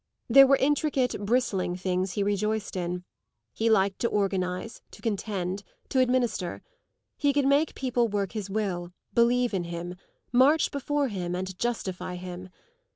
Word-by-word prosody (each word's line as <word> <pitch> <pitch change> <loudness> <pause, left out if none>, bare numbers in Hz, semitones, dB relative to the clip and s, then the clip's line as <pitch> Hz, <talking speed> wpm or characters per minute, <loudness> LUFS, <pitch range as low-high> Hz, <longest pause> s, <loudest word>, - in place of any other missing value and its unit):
There 270 +3 +8
were 275 - +6
intricate, 275 -2 +1
bristling 200 -5 +1
things 185 0 -1
he 205 - 0
rejoiced 205 +1 -1
in; 180 0 -3 0.5
he 225 +1 +1
liked 195 -3 +3
to 235 - +1
organise, 195 +1 -1
to - - -14
contend, 200 -3 -2 0.3
to 265 - +1
administer; 245 -8 0 0.5
he 285 -1 +3
could 280 -1 +1
make 285 +3 +3
people 250 -2 +1
work 200 -2 -2
his 210 -3 -5
will, 185 -4 -2 0.2
believe 240 0 +3
in 180 -3 -1
him, 170 +1 -5 0.4
march 270 +6 +4
before 285 0 -1
him 180 -4 -3
and 185 0 -4
justify 190 -6 -3
him. 180 +1 -7
205 Hz, 150 wpm, -27 LUFS, 185-250 Hz, 0.5 s, There